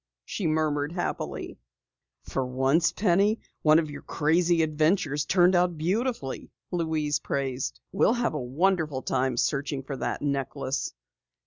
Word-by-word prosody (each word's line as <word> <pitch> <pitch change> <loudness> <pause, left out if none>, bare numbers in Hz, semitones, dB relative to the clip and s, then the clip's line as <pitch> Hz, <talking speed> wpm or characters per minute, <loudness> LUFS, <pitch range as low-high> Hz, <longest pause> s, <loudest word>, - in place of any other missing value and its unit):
she 185 - -2
murmured 155 -1 0
happily. 175 - -4 0.6
"For 135 - -2
once, 130 +6 +2
Penny, 200 +3 +2 0.2
one 155 0 +6
of 155 -2 0
your 140 - -8
crazy 165 +2 +2
adventures 155 -1 +1
turned 180 +2 +4
out 175 -1 +2
beautifully," 185 - -2 0.2
Louise 160 -4 0
praised. 135 -2 -3
"We'll 195 - +3
have 240 -5 0
a 150 - -2
wonderful 150 +1 0
time 130 -1 0
searching 140 +1 -1
for 135 +1 -5
that - - -3
necklace! 140 -1 -2
155 Hz, 130 wpm, -27 LUFS, 140-175 Hz, 0.6 s, one